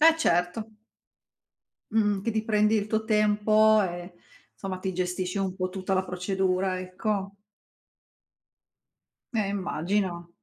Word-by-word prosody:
Eh, 320 +1 +7
certo. 180 - 0 1.2
Mh-mh, 210 -3 +2
che 230 - 0
ti 220 0 -1
prendi 215 0 +3
il 210 -1 0
tuo 220 0 0
tempo 215 0 +4
e 175 -1 -4 0.4
somma, 190 -2 -5
ti 190 -1 -3
gestisci 180 +1 -2
un 190 -1 -1
po' 185 -1 -2
tutta 190 +1 -3
la 190 0 +2
procedura, 185 0 -1
ecco. 195 +2 -3 2.0
Eh, 215 -4 0
immagino. 185 -2 -1
195 Hz, 120 wpm, -27 LUFS, 185-215 Hz, 2.0 s, Eh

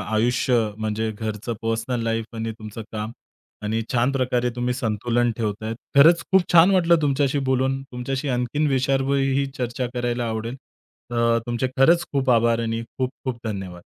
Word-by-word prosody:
आयुष्य 125 +3 +2 0.2
म्हणजे 110 0 -1
घरचं 110 +1 -4
पर्सनल 115 +2 -1
लाईफ 115 -1 -1
आणि 115 0 -3
तुमचं 110 +1 -7
काम 110 +1 -4 0.5
आणि 110 +2 -1
छान 125 +3 +2
प्रकारे 125 -2 0
तुम्ही 125 0 0
संतुलन 120 +1 0
ठेवताहेत. 110 0 -3 0.2
खरंच 165 +4 +7
खूप 190 - +6
छान 175 +2 +7
वाटलं 170 -3 +4
तुमच्याशी 140 -1 +1
बोलून 130 +1 +1
तुमच्याशी 135 +2 -4
आणखीन 125 +4 0
विषयावरही 135 +1 +1
चर्चा 125 0 -2
करायला 120 -1 -1
आवडेल. 115 +3 -4 0.5
तर 115 -1 +2
तुमचे 120 +2 -1
खरंच 165 +6 +5
खूप 135 -2 +1
आभार 115 -1 +3
आणि 115 0 -2
खूप-खूप 130 +1 -4
धन्यवाद. 95 -4 -5
120 Hz, 145 wpm, -23 LUFS, 115-135 Hz, 0.5 s, खरंच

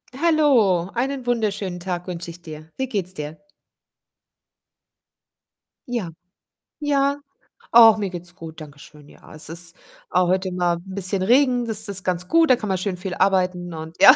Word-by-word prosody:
Hallo, 265 - +3
einen 260 +2 -2
wunderschönen 205 -6 -1
Tag 180 0 -4
wünsche 175 -1 -5
ich 170 +1 -14
dir. 155 -1 -11
Wie 265 - -2
geht's 195 -6 -3
dir? 150 -1 -7 2.5
Ja, 225 -9 -3 0.7
ja, 280 -1 +1 0.5
ach, 225 -2 +9
mir 200 -2 -2
geht's 175 -1 -9
gut, 165 -3 -10
danke 145 -1 -11
schön. 150 -1 -15
Ja, - - -15
es 155 - -5
ist 170 +1 -4 0.3
a 180 - +3
heute 185 +1 0
mal 175 -1 +1
'n 190 +2 -10
bisschen 190 0 -2
Regen, 250 +2 +3
das 215 -2 0
ist 195 -1 -2
ganz 180 -1 -2
gut. 330 -2 +4
Da 255 - +7
kann 215 -4 -5
man 190 - +1
schön 185 0 -2
viel 180 0 -5
arbeiten 180 -2 +1
und 160 +1 -8
ja. 255 - +10
185 Hz, 165 wpm, -22 LUFS, 175-235 Hz, 2.5 s, ja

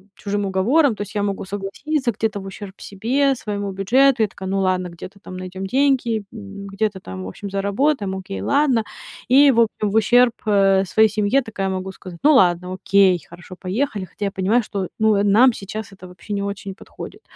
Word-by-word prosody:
чужим 205 0 -3
уговорам. 225 +8 +2
То - - -8
есть 205 +1 -7
я 205 - 0
могу 200 -1 -2
согласиться 235 +8 -2
где-то 215 0 -2
в 195 - -9
ущерб 195 0 -9
себе, 260 +7 0
своему 205 -3 -4
бюджету. 240 +6 +3
Я - - +2
такая: 190 0 -8
"Ну 195 - 0
ладно, 185 -1 0
где-то 180 +4 -11
там 185 -2 -9
найдём 185 +1 -6
деньги, 265 +1 +2 0.2
м, 200 -2 -9
где-то 200 0 -2
там, 95 - -8
в - - -6
общем, 195 - -7
заработаем, 200 +2 0
окей, 100 - -6
ладно". 255 - +2 0.5
И, 275 +2 +7
в 235 - +1
общем, 215 -2 0
в - - -3
ущерб, 240 +2 +4
э, 195 -2 +4
своей 220 +4 +4
семье 210 +6 +1
такая 210 -5 -4
могу 190 0 -4
сказать: 180 -3 -11
"Ну 305 - +6
ладно, 180 -6 +3
окей, 190 -1 +3
хорошо, 175 +2 -12
поехали". 205 +1 -2
Хотя 205 - -6
я 195 - -1
понимаю, 200 +6 +1
что, 195 -4 -4
ну, 220 -1 +4
э, 200 - +2
нам 225 +5 +5
сейчас 215 +1 -7
это 185 -1 -12
вообще 180 +3 -9
не 200 0 -1
очень 200 -1 -5
подходит. - - -11
200 Hz, 200 wpm, -21 LUFS, 190-225 Hz, 0.5 s, И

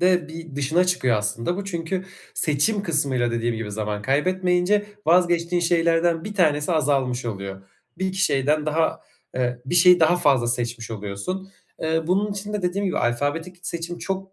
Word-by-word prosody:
de 180 -3 +2
bir 160 -3 -9
dışına 155 +6 +2
çıkıyor 155 -11 +2
aslında 110 - -1
bu 200 - -4
çünkü 185 0 -3 0.3
seçim 165 +8 +2
kısmıyla 140 - +1
dediğim 115 0 -1
gibi 110 -2 -5
zaman 105 -1 -3
kaybetmeyince 180 - +1 0.2
vazgeçtiğin 175 0 +3
şeylerden 170 0 +2
1 210 -1 -6
tanesi 155 -3 +2
azalmış 135 -5 +1
oluyor. 100 -3 -5 0.4
1-2 190 0 -2
şeyden 150 +2 +1
daha 160 +1 0 0.4
eee, 125 -1 -1
bir 175 - -2
şeyi 180 0 +7
daha 165 +2 +5
fazla 135 -8 +3
seçmiş 120 -1 -2
oluyorsun. 110 - -5 0.3
Eee, 160 0 0
bunun 200 +3 +1
için 205 +1 -5
de 210 -2 -2
dediğim 195 +3 -1
gibi - - -1
alfabetik 145 +9 -1
seçim 170 0 -4
çok, 190 0 -3
eee, 190 - -35
165 Hz, 165 wpm, -23 LUFS, 125-180 Hz, 0.4 s, şeyi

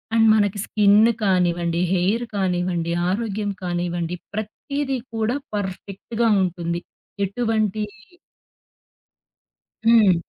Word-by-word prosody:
And 225 -1 +5
మనకి 205 -1 +1
skin 205 -1 +5 0.3
కానివ్వండి, 175 -2 +1
hair 200 +7 +1
కానివ్వండి, 175 -3 0 0.2
ఆరోగ్యం 205 0 -1
కానివ్వండి 175 -1 -2 0.2
ప్రతీదీ 265 +6 -3 0.2
కూడా 225 +4 0 0.2
పర్ఫెక్ట్‌గా 205 +4 -2
ఉంటుంది 170 -1 -2 0.4
ఎటువంటి 215 0 0 2.0
హ్మ్. 225 -5 +6
200 Hz, 80 wpm, -22 LUFS, 175-220 Hz, 2.0 s, హ్మ్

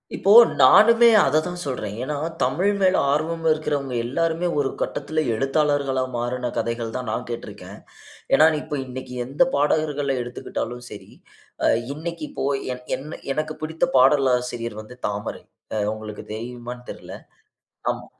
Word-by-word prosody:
இப்போ 200 - +4 0.3
நானுமே 230 - +7 0.2
அத 150 +3 +3
தான் 180 0 -5
சொல்றேன். 125 -7 -4
ஏன்னா, 145 +2 -3 0.3
தமிழ் 200 +3 +1
மேல் 185 0 +4 0.2
ஆர்வம் 160 +3 -1
இருக்கிறவங்க 145 -4 -1
எல்லாருமே 165 +6 0
ஒரு 135 - +1
கட்டத்தில 155 0 -2
எழுத்தாளர்களா 135 0 +1
மாறுன 125 0 -2
கதைகள் 115 -1 -2
தான் 125 -3 -5
நான் 125 +2 -3
கேட்டிருக்கேன். 120 - -8 0.6
ஏன்னா, 155 - +7 0.2
இப்ப 150 -2 -4
இன்னக்கி 130 0 -8
எந்த 140 - +2
பாடகர்கள 145 -1 +1
எடுத்துக்கிட்டாலும் 120 0 -5
சரி, 105 - -11 0.5
அ - - +5 0.3
இன்னக்கி 165 0 -6
இப்போ - - -3 0.3
என் 125 0 -15
எ - - -10 0.3
எனக்கு 155 +1 -3
பிடித்த 160 +1 0
பாடலாசிரியர் 125 -4 +2
வந்து 125 +3 -13
தாமரை. 105 0 -5 0.3
அ - - 0 0.2
உங்களுக்கு 110 -1 -8
தெரியுமான்னு 120 +2 -7
தெரியல. - - -10 0.8
அம். - - -7
135 Hz, 135 wpm, -23 LUFS, 125-155 Hz, 0.8 s, நானுமே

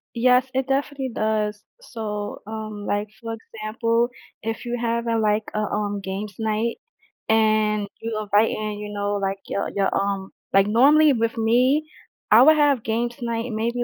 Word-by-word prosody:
Yes, 250 +2 +4
it 265 0 0
definitely 275 -1 -1
does. 215 -1 -1 0.2
So, 210 - -5
um, 215 -1 -6
like, 205 +1 -1
for 225 0 -4
example, 230 +2 -1 0.3
if 225 +2 -4
you're 240 0 -3
having 230 -1 0
like 210 0 +2
a, 215 - -1
um, 205 -1 -2
games 195 +2 -5
night 220 +1 -1 0.5
and 215 -2 +2
you 225 -1 -3
invite 210 +1 +3
in, 215 -1 -3
you 210 0 -6
know, 205 0 -2
like, 195 0 -1
your 200 - -2
your, 195 -1 +2
um 195 -1 -1 0.2
like, 195 0 +5
normally 285 +6 +5
with 230 0 -1
me 255 +7 +3 0.4
I 225 +3 +8
would 310 +1 +7
have 285 -6 +3
games 235 +2 -1
night 230 0 -2
maybe 235 +3 -1
220 Hz, 160 wpm, -23 LUFS, 210-235 Hz, 0.5 s, I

